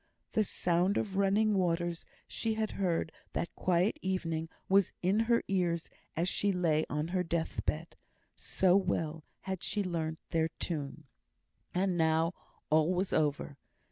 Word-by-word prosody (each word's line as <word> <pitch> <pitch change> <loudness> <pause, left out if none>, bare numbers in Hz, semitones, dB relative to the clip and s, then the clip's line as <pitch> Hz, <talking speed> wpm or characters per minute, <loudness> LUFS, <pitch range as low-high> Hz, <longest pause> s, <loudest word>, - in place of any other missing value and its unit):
The 215 - +3
sound 180 0 +1
of 195 -3 -2
running 200 +2 +3
waters 175 -2 0 0.2
she 225 -1 -1
heard 190 -7 0 0.2
that 170 - -2
quiet 180 +2 +1
evening, 165 -4 -1 0.2
was 195 -1 +4
in 190 +4 +3
her 235 +1 +3
ears 175 -3 0 0.3
as 170 +2 +1
she 200 +2 +1
lay 165 -4 +1
on 150 +2 -1
her 185 0 +1
death 165 -1 -2
bed; 160 +2 -2 0.4
so 185 -1 +2
well 165 -5 0 0.2
had 190 -2 -4
she 205 - -1
learnt 160 -3 -2
their 165 -1 +2
tune. 155 -2 -4 0.7
And 180 -1 +1
now 160 +1 +3 0.4
all 155 +2 +4
was 185 +2 0
over. 145 -2 0
175 Hz, 140 wpm, -32 LUFS, 160-190 Hz, 0.7 s, was